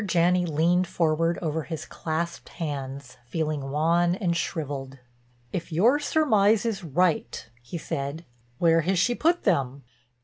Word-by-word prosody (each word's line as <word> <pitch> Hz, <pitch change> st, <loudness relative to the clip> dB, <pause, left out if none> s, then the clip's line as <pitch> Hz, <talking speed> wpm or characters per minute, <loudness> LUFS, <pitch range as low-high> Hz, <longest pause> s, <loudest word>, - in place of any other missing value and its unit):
Janney 180 Hz, -1 st, +2 dB
leaned 170 Hz, +4 st, +2 dB
forward 165 Hz, 0 st, +1 dB
over 160 Hz, 0 st, -1 dB
his 160 Hz, 0 st, -6 dB
clasped 170 Hz, +1 st, -4 dB
hands, 140 Hz, -4 st, -6 dB
feeling 150 Hz, 0 st, -2 dB
wan 170 Hz, +4 st, +2 dB
and 180 Hz, -3 st, -1 dB
shriveled. 140 Hz, -6 st, -4 dB, 0.6 s
"If 170 Hz, -1 st, -4 dB
your 230 Hz, -, +4 dB
surmise 225 Hz, -9 st, +3 dB
is 215 Hz, -5 st, -2 dB
right," 165 Hz, -7 st, 0 dB
he 120 Hz, +8 st, -6 dB
said, 155 Hz, 0 st, -4 dB, 0.3 s
"where 165 Hz, +1 st, +4 dB
has 185 Hz, +4 st, 0 dB
she 240 Hz, +7 st, +3 dB
put 335 Hz, +7 st, +1 dB
them?" 140 Hz, -, 0 dB
165 Hz, 135 wpm, -26 LUFS, 150-180 Hz, 0.6 s, your